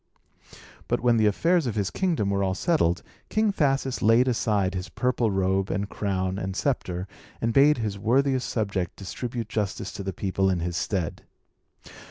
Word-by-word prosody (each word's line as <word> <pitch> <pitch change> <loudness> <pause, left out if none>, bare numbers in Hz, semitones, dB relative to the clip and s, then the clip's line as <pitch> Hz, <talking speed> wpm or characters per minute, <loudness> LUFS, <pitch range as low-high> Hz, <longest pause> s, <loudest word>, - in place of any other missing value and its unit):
But, - - 0
when 120 -1 +3
the 110 -1 +4
affairs 165 - +2
of 115 - -2
his 100 -3 -1
kingdom 165 - 0
were 100 0 +1
all 95 -1 0
settled, 100 - +1 0.3
King 215 -1 +2
Thasus 135 -5 0
laid 115 +4 +5
aside 105 -6 +1
his 90 -1 -4
purple 125 -2 0
robe, 95 0 +1
and 100 +1 -1
crown, 95 -1 -2
and 95 -1 -4
sceptre, 95 -8 -1 0.3
and 115 0 0
bade 145 +3 +6
his 105 -4 -3
worthiest 130 +4 +2
subject 100 -6 -2
distribute 115 +3 -5
justice 105 -3 -3
to - - -7
the 95 0 -3
people 95 +1 0
in 90 -2 +1
his 85 0 -3
stead. 90 -2 -2
105 Hz, 170 wpm, -26 LUFS, 95-125 Hz, 0.3 s, bade